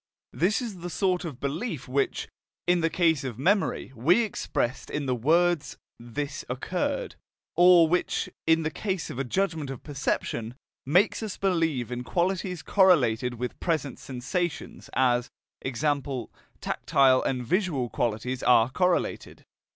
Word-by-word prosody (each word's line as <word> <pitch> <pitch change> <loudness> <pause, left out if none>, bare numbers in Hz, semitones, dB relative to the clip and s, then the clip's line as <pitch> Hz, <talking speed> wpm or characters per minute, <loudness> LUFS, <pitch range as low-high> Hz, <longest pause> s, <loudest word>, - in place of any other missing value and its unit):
This 205 +8 +1
is 210 -6 -6
the 175 +1 -5
sort 180 +2 0
of 145 -7 -6
belief 150 - -3
which, 135 +2 -1 0.4
in 175 0 +3
the 165 - +2
case 165 -4 +2
of 125 -5 -5
memory, 185 -2 +1
we 170 - +4
expressed 130 - -2
in 150 -1 -3
the 130 - 0
words 165 +6 +2 0.2
"this 120 +5 -5
occurred"; - - -2 0.4
or 175 -1 +7
which, 180 +3 0 0.2
in 160 0 +4
the 155 - -1
case 190 -4 -3
of 125 - -6
a - - +1
judgment 160 0 -1
of 135 - -7
perception, 125 -5 -2 0.3
makes 180 +12 +3
us 215 -3 -5
believe 165 - 0
in 125 0 -3
qualities 180 +2 -1
correlated 125 - +3
with 125 +1 -5
present 155 -5 -1
sensations, 140 +7 -4
as 125 -2 +2 0.3
e.g., 135 +2 -3 0.7
tactile 130 -2 +3
and 125 -2 -2
visual 165 - 0
qualities 120 +3 -2
are 120 0 +4
correlated. 180 +4 -1
155 Hz, 140 wpm, -27 LUFS, 125-180 Hz, 0.7 s, or